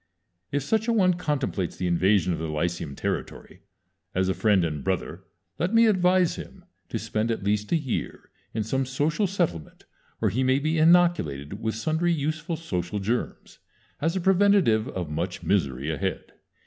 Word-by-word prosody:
If 145 -1 0
such 220 - 0
a 235 - +2
one 185 -5 +4
contemplates 145 - -2
the 90 - -3
invasion 90 +1 +2
of 80 - -3
the 80 - -3
lyceum 75 -2 -2
territory, - - -5 0.5
as 95 0 +1
a - - +2
friend 100 -4 +3
and 75 -4 -4
brother - - -3 0.3
let 180 +7 0
me 230 0 +7
advise 185 -4 +3
him - - -10 0.2
to - - -2
spend 110 +2 -2
at 115 -3 -2
least 105 +1 0
a - - +4
year 145 -7 -3 0.2
in 110 - -2
some 135 +5 0
social 150 +9 0
settlement 85 - -3 0.3
where - - 0
he 125 - 0
may 130 0 +3
be 155 +3 0
inoculated 155 - +3
with 110 -1 -2
sundry 160 +9 0
useful 155 +3 -2
social 95 - -3
germs, 110 +5 -3 0.4
as 165 +4 0
a 190 - 0
preventive 190 - +4
of 90 -5 -5
much 90 +4 -3
misery 70 -6 0
ahead. 75 - -3
115 Hz, 170 wpm, -26 LUFS, -, 0.5 s, me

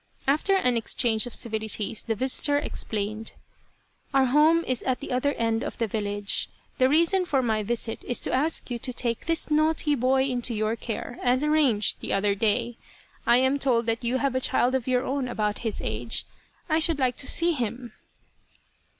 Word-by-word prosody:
After 305 +8 +2
an 250 -10 +2
exchange 225 0 +1
of 240 - -7
civilities, 220 -1 0
the 225 - -2
visitor 265 +5 +2
explained: 215 -5 -4 0.4
" - - -40
Our 270 -1 +5
home 305 +6 +4
is 255 -2 0
at 255 -1 -1
the 280 - -7
other 255 +3 0
end 225 -1 -1
of - - -6
the 230 - 0
village. 205 -1 -2 0.3
The 255 0 +4
reason 335 +5 +3
for 280 -7 0
my 220 -2 0
visit 225 +1 -4
is 245 - -1
to - - 0
ask 285 0 0
you 240 - -3
to 255 - -4
take 235 +1 -2
this 330 -1 +1
naughty 310 0 +2
boy 265 0 +2
into 245 -3 -2
your 215 +1 -1
care, 235 +1 -6
as 255 +3 +1
arranged 295 -9 +2
the - - -4
other 200 +1 +2
day. 230 +3 -1 0.5
I 235 - +6
am 260 +2 +2
told 240 -4 +1
that 230 +1 -1
you 240 +2 0
have 275 -1 -1
a 260 - -1
child 250 0 +2
of 265 -2 -1
your 250 0 +1
own 270 -1 -2
about 210 -3 -2
his 225 -3 -4
age. 110 +2 0 0.4
I 315 -1 +2
should 320 -1 +4
like 255 -3 0
to 275 - 0
see 340 +1 +3
him 240 -4 -4
250 Hz, 195 wpm, -25 LUFS, 225-280 Hz, 0.5 s, I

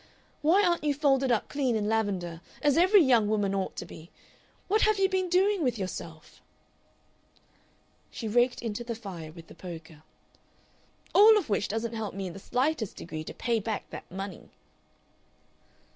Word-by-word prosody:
Why 340 +7 +4
aren't 345 -3 +1
you 295 -1 +1
folded 270 -3 +2
up 230 - +1
clean 265 -5 0
in 210 -1 -1
lavender 190 -7 -1 0.2
as 290 -2 +4
every 375 +2 +6
young 235 -6 +4
woman 205 -2 +1
ought 195 -1 -2
to - - -5
be? 170 -1 -12 0.6
What 430 +3 +2
have 430 -1 +3
you 390 0 +3
been 375 -1 -1
doing 385 +2 +3
with 245 -4 0
yourself?..." 165 -4 -7 1.7
She 225 - -6
raked 240 +3 +2
into 230 0 -3
the 235 -1 -4
fire 180 -8 -8
with 165 0 -12
the - - -14
poker. 165 -3 -10 1.1
"All 430 +2 +8
of 400 - -2
which 200 0 +1
doesn't 225 +2 -3
help 220 -4 -4
me 195 -1 -4
in 180 - -5
the 195 - -9
slightest 250 - -1
degree 155 -2 -6
to - - -7
pay 235 -2 0
back 215 0 -4
that - - -9
money." 195 0 -7
225 Hz, 170 wpm, -28 LUFS, 190-295 Hz, 1.7 s, All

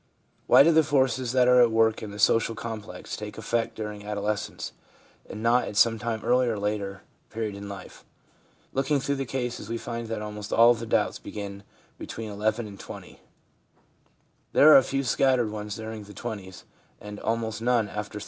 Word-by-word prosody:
Why - - +8
do 165 - +5
the 160 0 +6
forces 130 -4 +1
that 125 -1 +4
are 125 0 +6
at 120 - +6
work 110 0 +2
in 110 - -6
the 100 - -9
social 115 +2 +3
complex 110 -5 -6
take 105 0 -8
effect 115 +1 -1
during 105 -1 -6
adolescence, 105 0 -3 0.6
and 110 - -7
not 120 +1 +3
at 100 - -6
some 115 0 +4
earlier 120 +1 +1
or - - -4
later 100 -1 -3 0.3
period 110 -2 -3
in 100 0 -8
life? 100 -2 -10 0.7
Looking 140 +2 +1
through 140 +1 -1
the 135 -1 -3
cases, 125 -5 -4
we 115 - -2
find 115 0 -5
that 110 -1 -4
almost 105 0 -7
all 115 +1 +7
of 120 - 0
the 115 - -6
doubts - - +1
begin 100 -1 -7 0.4
between 110 -1 -6
11 110 +3 -1
and 100 -2 -10
20. - - -10 1.3
There 155 - +8
are - - +11
a - - +7
few 135 +1 -2
scattered 130 -3 +2
ones 105 -1 -5
during 110 -1 -7
the 105 - -13
twenties, 100 -6 -7 0.4
and 105 0 -9
almost 115 -1 -2
none 120 -2 +2
after 105 0 -6
30. - - -4
110 Hz, 185 wpm, -26 LUFS, 105-120 Hz, 1.3 s, are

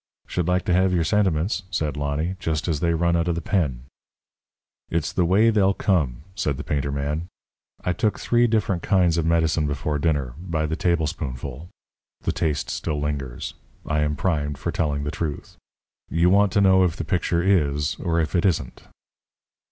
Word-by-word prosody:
"Should 90 -1 -2
like 90 0 +1
to 90 - +1
have 90 0 +3
your 85 - +2
sentiments," 95 -1 +1
said 75 -6 -1
Lonny, 75 +5 -2
"just 80 -2 -2
as 80 -4 0
they 85 +1 +1
run 85 +1 +2
out 85 0 +1
of 85 - +1
the - - -1
pen." 70 -13 -1 1.1
"It's 85 -1 -1
the 90 - +2
way 105 +6 +4
they'll 100 -2 +3
come," 75 - 0
said 70 -8 -1
the 75 - -5
painter 70 -2 -1
man. 75 +4 -2 0.6
"I 90 - +1
took 105 +4 0
three 120 0 +3
different 105 -6 0
kinds 90 -4 +2
of 80 - 0
medicine 80 -2 +2
before 75 +1 -2
dinner 70 -5 0
by 85 -3 -2
the 80 +1 -1
tablespoonful. 80 -4 -2 0.5
The - - 0
taste 75 -4 -1
still 75 -3 -2
lingers. 70 -4 -3 0.3
I 80 -1 0
am 75 0 +1
primed 75 -5 -1
for 65 - -3
telling 75 -3 -1
the 75 - -2
truth. 75 -4 -5 0.5
You 85 +2 +3
want 100 0 +4
to 100 - +3
know 95 -1 +5
if 85 -3 +1
the - - -4
picture 85 -2 0
is, 75 -6 +2
or 85 -1 0
if 80 0 -1
it 85 - +2
isn't?" 75 -10 0
80 Hz, 185 wpm, -24 LUFS, 75-90 Hz, 1.1 s, know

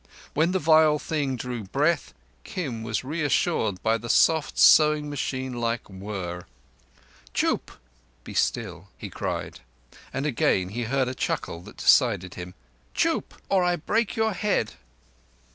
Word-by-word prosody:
When 160 +4 +2
the 190 - +1
vile 155 -2 +5
thing 145 -3 -2
drew 120 -2 -5
breath, 145 - 0 0.3
Kim 135 -11 -4
was 110 0 -2
reassured 130 - 0
by 115 0 +2
the 120 +2 -8
soft, 160 +3 +3
sewing 150 -1 +6
machine 130 -2 -3
like 115 -1 -2
whirr. 95 -3 -6 0.9
"Chûp! - - 0 0.5
(Be - - -9
still)" - - -1
he - - -8
cried, - - -4 0.5
and 135 +2 -3
again 105 -9 +1
he 115 +4 -3
heard 130 +2 +1
a 125 - -3
chuckle 85 -8 -3
that - - -13
decided 90 0 +3
him. 90 +1 -8 0.4
"Chûp—or 190 -2 0
I 175 0 +2
break 215 +7 -1
your 220 -1 +1
head." 190 - 0
130 Hz, 135 wpm, -25 LUFS, 110-155 Hz, 0.9 s, sewing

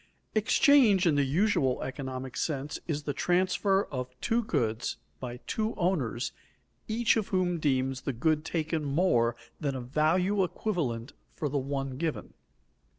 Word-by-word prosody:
_Exchange 220 - +5
in 165 - +4
the 145 0 +3
usual 140 -3 +1
economic 130 -1 -5
sense 145 -2 -2
is 150 -3 -2
the 145 - -2
transfer 185 +5 +2
of 125 -1 -5
two 230 +1 +1
goods 115 - -1 0.2
by 125 -1 -5
two 220 0 -1
owners, 150 - 0 0.6
each 230 +1 +2
of 215 - -1
whom 180 -5 0
deems 130 -3 0
the - - -2
good 155 +5 +1
taken 160 -1 -1
more 140 -6 +2 0.2
than 140 -4 -1
a 130 - -3
value 170 +10 +2
equivalent 145 - -2 0.2
for 150 - -2
the 140 +1 0
one 135 -1 -3
given. 160 0 -3
150 Hz, 145 wpm, -29 LUFS, 130-185 Hz, 0.6 s, Exchange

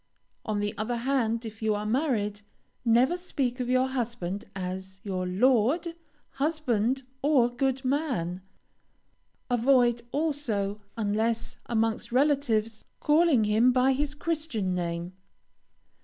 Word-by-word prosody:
On 215 -1 -1
the 205 +1 -2
other 230 +3 -1
hand, 235 -2 0
if 220 0 -8
you 215 -1 +1
are 205 +1 -3
married, 215 -5 0 0.4
never 245 +7 +4
speak 275 -8 -2
of 250 -1 -2
your 255 0 +3
husband 235 -7 -3
as 190 0 -5
your 185 -3 -2
"lord," 255 - +2 0.4
"husband," 270 -4 0 0.2
or 270 -5 +3
"good 265 0 0
man," 255 - -1 1.1
avoid, 245 -1 +3
also, 240 -10 -1 0.2
unless 225 +2 -1
amongst 225 -1 0
relatives, 245 -5 +1 0.2
calling 300 -5 +4
him 220 +4 +4
by 255 +1 +3
his 290 +2 -1
Christian 300 - -1
name. 170 0 -3
235 Hz, 115 wpm, -28 LUFS, 210-270 Hz, 1.1 s, never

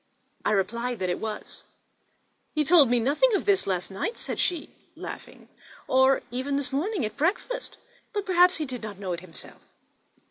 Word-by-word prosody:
I - - +1
replied 235 +5 0
that 185 -2 -1
it - - -2
was. 215 -1 -6 0.9
"He 305 - +3
told 310 -2 +7
us 240 - +1
nothing 305 - +3
of - - +1
all - - -20
this 395 - +3
last 185 0 -1
night," 195 - -3
said - - -4
she, 345 -4 -1 0.2
laughing, - - -9 0.4
"or 265 +1 +4
even 260 +3 -2
this 285 0 -1
morning 330 - 0
at 215 - -5
breakfast; 435 - -1 0.3
but 410 -1 -2
perhaps 360 0 +5
he 310 - -2
did 255 -3 -6
not 210 -3 -7
know 190 -2 -3
it 170 - -4
himself. 170 -3 -11
265 Hz, 180 wpm, -27 LUFS, 215-355 Hz, 0.9 s, told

